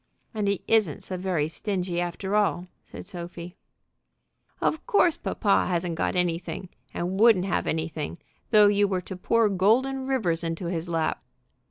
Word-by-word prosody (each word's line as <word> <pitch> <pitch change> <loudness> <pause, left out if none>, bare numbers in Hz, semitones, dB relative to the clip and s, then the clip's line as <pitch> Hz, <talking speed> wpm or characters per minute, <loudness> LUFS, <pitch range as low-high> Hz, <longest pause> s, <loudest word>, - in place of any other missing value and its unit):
"And 210 -2 -1
he 200 -1 -1
isn't 215 -9 +2
so 185 - -3
very 180 -5 -1
stingy, 180 0 -2
after 190 +3 -3
all," 200 -4 +1 0.2
said - - -10
Sophie. 175 -1 -8 1.0
"Of 315 - -1
course 355 -6 +4
papa 200 -3 +1
hasn't 175 -1 -1
got 165 - -1
anything, 175 +1 -2 0.2
and 180 +3 -3
wouldn't 220 -5 +5
have 195 - -1
anything, 160 0 -3 0.3
though 210 -2 +7
you 205 0 +4
were 190 -2 -1
to 190 - -8
pour 225 +5 +2
golden 250 +8 +2
rivers 180 -12 0
into 165 +2 -3
his 170 0 -3
lap." 165 -1 -1
185 Hz, 155 wpm, -26 LUFS, 170-210 Hz, 1.0 s, though